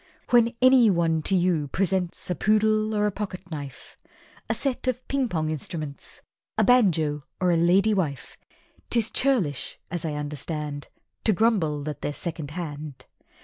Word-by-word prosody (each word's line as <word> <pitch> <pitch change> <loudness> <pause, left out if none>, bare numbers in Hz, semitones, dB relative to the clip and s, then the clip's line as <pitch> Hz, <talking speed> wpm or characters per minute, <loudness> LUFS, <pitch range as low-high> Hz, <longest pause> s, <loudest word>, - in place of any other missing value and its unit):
When 235 0 +4
anyone 190 -11 +5
to 190 - +2
you 175 -5 +1
presents 180 +2 -1
A - - +3
poodle, 215 +2 +2
or 210 0 +2
a 210 - +1
pocketknife, 180 -9 -7 0.5
A - - +1
set 265 -2 -2
of 255 0 -2
Ping 270 -3 0
pong 155 -4 -1
instruments, 155 -1 -6 0.3
A - - +4
banjo 165 -12 +3 0.2
or 180 -1 +2
a - - +3
Lady 185 +6 +4
wife, 155 -9 -2 0.5
'Tis 230 -2 +1
churlish, 210 - 0
as 175 -2 -1
I 155 -2 -2
understand, 150 0 -4 0.4
To 220 - +4
grumble 175 -9 +1
that 150 -1 -5
they're 145 - -2
second 160 -2 -3
hand. 150 -4 -7
175 Hz, 145 wpm, -25 LUFS, 150-215 Hz, 0.5 s, anyone